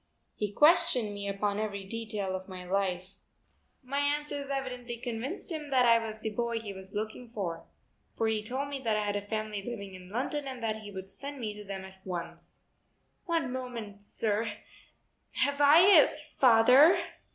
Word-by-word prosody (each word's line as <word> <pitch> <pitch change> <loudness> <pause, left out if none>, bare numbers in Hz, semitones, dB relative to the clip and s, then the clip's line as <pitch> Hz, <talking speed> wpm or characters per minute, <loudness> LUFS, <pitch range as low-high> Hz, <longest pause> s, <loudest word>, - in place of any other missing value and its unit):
He 210 -1 -3
questioned 295 - +4
me 200 0 -4
upon 200 +1 -1
every 200 -2 -3
detail 210 -2 -3
of 185 0 -6
my 185 -1 -7
life. 185 -1 -1 0.7
My 275 +2 -2
answers 285 -1 -1
evidently 250 -3 -4
convinced 245 - -4
him 305 -3 -4
that 255 -2 +4
I 230 -1 +5
was 220 -1 -5
the 220 - -2
boy 235 +1 -1
he 210 -3 -6
was 190 0 -9
looking 220 +3 -4
for, 180 -7 -4 0.5
for 225 - +1
he 220 -1 +1
told 260 +6 -2
me 280 -1 -4
that 225 -4 +1
I 210 - 0
had 205 0 -1
a 205 - -1
family 215 0 -3
living 200 -3 -6
in 180 -1 -11
London 270 +6 -2
and 255 -3 -6
that 220 -1 0
he 215 -1 -9
would 190 -1 -7
send 285 0 -6
me 215 -3 -3
to 210 0 -9
them 195 -1 -6
at 190 0 -14
once. 175 -3 -7 0.6
"One 330 -8 0
moment, 230 -6 -6
sir. 215 +1 -1 0.8
Have 285 0 +1
I 290 +4 +8
a 360 -7 +7
father?" 270 +1 +6
225 Hz, 180 wpm, -30 LUFS, 205-270 Hz, 0.8 s, I